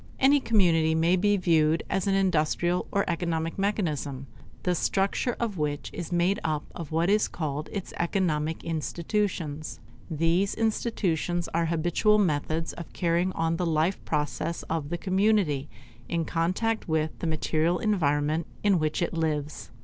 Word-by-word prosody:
Any 280 +2 +5
community 170 -10 +3
may 165 +3 +3
be 205 +2 +2
viewed 165 -3 +3
as 195 0 -1
an 195 - +3
industrial 175 -1 +1
or 200 - +1
economic 165 0 -2
mechanism, 155 -9 -1 0.4
the 180 - +2
structure 195 +7 0
of 215 -7 -2
which 145 -1 -2
is 175 -1 -6
made 175 +3 +2
up 155 -2 -1
of 165 -3 -7
what 165 +2 +1
is 210 +2 +3
called 150 -2 -4
its 200 -3 -5
economic 165 -3 0
institutions. 165 -1 -2 0.3
These 165 +5 +1
institutions 185 -6 0
are 170 0 0
habitual 175 +6 +2
methods 160 -3 0
of 170 - -9
carrying 175 +1 +1
on 165 0 0
the 180 - -1
life 160 +4 +1
process 150 +3 -2
of 160 -3 -3
the 175 - -2
community 190 -6 +1 0.4
in 170 -1 0
contact 185 +8 -1
with 155 -1 0
the 170 - -2
material 160 +2 +1
environment 155 -6 +1 0.2
in 200 -4 +4
which 155 +2 0
it 170 - -2
lives. 155 -3 -2
170 Hz, 150 wpm, -27 LUFS, 155-190 Hz, 0.4 s, Any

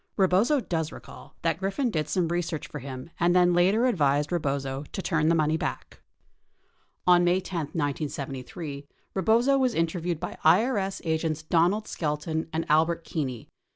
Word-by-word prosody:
Rebozo 200 +9 +3
does 165 -8 -2
recall - - -12
that 165 -1 0
Griffin 210 +7 -1
did 155 -4 -2
some 175 +1 +1
re 175 +1 0
search 160 -3 -4
for - - -7
him 130 +4 -8
and 175 +1 +3
then 180 -1 +5
later 190 +7 +3
advised 150 - +2
Rebozo 140 -5 -1
to - - -4
turn 160 -4 +1
the 165 - +4
money 155 0 +2
back. - - -5 1.0
33 180 - +7
On 175 0 +5
May 175 +1 +3
10, 185 -1 -6
1973, 145 -1 -4 0.3
Rebozo 235 +8 +3
was 255 -2 +1
interviewed 165 0 -1
by - - -6
IRS 195 +3 +3
agents 160 -1 -1
Donald 175 +7 +2
Skelton 160 +1 -2
and 160 +1 -2
Albert 165 +2 +2
Keeney. 130 -9 -4
165 Hz, 160 wpm, -27 LUFS, 150-185 Hz, 1.0 s, 33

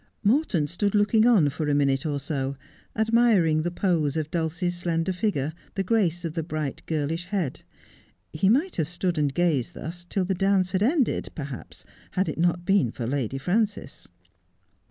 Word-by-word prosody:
Morton 210 - +2
stood 200 +7 -1
looking 215 +2 +4
on 195 -12 +5
for 150 +2 -3
a 145 - +2
minute 140 0 +1
or 145 -2 -1
so, 140 -1 -3 0.4
admiring 220 -8 +3
the 175 - -1
pose 165 -5 0
of 155 -1 -3
Dulcie's 175 +2 -1
slender 170 0 -1
figure, 175 -7 -1 0.2
the 195 - 0
grace 180 -5 +1
of 165 - -3
the 165 - -2
bright 155 -3 -4
girlish 160 +2 -2
head. 180 -7 -2 0.7
He 190 +5 +2
might 295 - +2
have 160 -4 0
stood 175 -1 -1
and 145 -2 +1
gazed 150 -5 0
thus 175 +2 -6
till 185 +1 -1
the 190 - 0
dance 190 0 +2
had 185 - 0
ended 265 +3 +1
per 150 - -4
haps 135 -3 -9 0.3
had 190 +1 +1
it - - -4
not 175 0 +1
been 195 - +3
for 120 - -5
Lady 135 0 -2
Frances. 205 +9 -2
175 Hz, 175 wpm, -25 LUFS, 150-195 Hz, 0.7 s, on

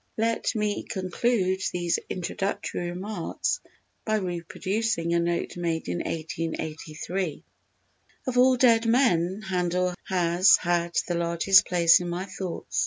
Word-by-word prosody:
Let 230 +1 0
me 210 -1 -1
conclude 190 0 -1
these 175 -1 0
introductory 180 -1 -3
remarks 190 - -3 0.4
by 215 - 0
reproducing 185 0 -2
a 170 - +3
note 170 0 -1
made 165 -2 -2
in 90 - -2
1883: 160 +1 -4 0.8
"Of 255 - -2
all 255 +1 +5
dead 230 -2 +4
men 215 -6 +2
Handel 180 -1 0
has 180 0 +4
had 170 -1 -1
the 175 - -1
largest 170 +3 +4
place 170 -2 +5
in 175 -1 -4
my 175 +2 -3
thoughts. 190 -2 -5
180 Hz, 120 wpm, -26 LUFS, 170-205 Hz, 0.8 s, all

